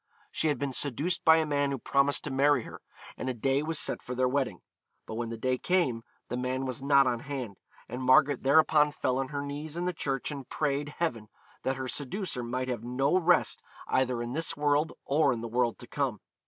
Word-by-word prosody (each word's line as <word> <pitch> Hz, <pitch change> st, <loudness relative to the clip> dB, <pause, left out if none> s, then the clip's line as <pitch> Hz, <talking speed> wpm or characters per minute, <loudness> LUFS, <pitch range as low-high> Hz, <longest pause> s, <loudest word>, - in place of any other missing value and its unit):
She 160 Hz, -, +1 dB
had 145 Hz, -3 st, +1 dB
been 140 Hz, 0 st, -3 dB
seduced 160 Hz, +7 st, +1 dB
by 160 Hz, -1 st, +7 dB
a 160 Hz, -, +2 dB
man 145 Hz, -1 st, +1 dB
who 140 Hz, -, -2 dB
promised 140 Hz, +2 st, +2 dB
to 145 Hz, -, -4 dB
marry 135 Hz, -1 st, +3 dB
her, -, -, -10 dB, 0.4 s
and 130 Hz, -, -3 dB
a 130 Hz, -, -2 dB
day 135 Hz, +4 st, +1 dB
was 160 Hz, +1 st, -2 dB
set -, -, 0 dB
for 125 Hz, -, -6 dB
their 130 Hz, +1 st, +2 dB
wedding; 135 Hz, 0 st, -1 dB, 0.4 s
but -, -, -7 dB
when 115 Hz, +1 st, -3 dB
the 115 Hz, -, -5 dB
day 130 Hz, +2 st, 0 dB
came, 140 Hz, -11 st, +1 dB, 0.2 s
the 125 Hz, -, -3 dB
man 130 Hz, +1 st, -2 dB
was 130 Hz, -1 st, -4 dB
not 140 Hz, 0 st, +5 dB
on 120 Hz, -2 st, 0 dB
hand, 125 Hz, -7 st, -6 dB, 0.3 s
and 125 Hz, +3 st, -6 dB
Margaret 135 Hz, +1 st, +4 dB
thereupon 150 Hz, +1 st, +4 dB
fell 130 Hz, -2 st, -1 dB
on 135 Hz, -, -1 dB
her 145 Hz, +1 st, -4 dB
knees 145 Hz, +3 st, -6 dB
in 175 Hz, -, -2 dB
the 180 Hz, -, -1 dB
church 135 Hz, -3 st, -2 dB
and 140 Hz, -3 st, -7 dB
prayed 145 Hz, 0 st, -2 dB
Heaven 115 Hz, -11 st, -2 dB, 0.3 s
that 135 Hz, -, -1 dB
her 130 Hz, -1 st, -4 dB
seducer 145 Hz, +2 st, -3 dB
might 125 Hz, +2 st, -3 dB
have 120 Hz, -3 st, -3 dB
no 135 Hz, +6 st, +1 dB
rest 175 Hz, -1 st, +3 dB, 0.3 s
either 125 Hz, -2 st, +1 dB
in 120 Hz, +1 st, -5 dB
this 165 Hz, +1 st, -2 dB
world 145 Hz, +1 st, +2 dB
or 140 Hz, 0 st, +3 dB
in 115 Hz, -, -5 dB
the 115 Hz, -, -4 dB
world 120 Hz, 0 st, 0 dB
to -, -, -11 dB
come. 130 Hz, -5 st, -2 dB
135 Hz, 220 wpm, -29 LUFS, 125-150 Hz, 0.4 s, by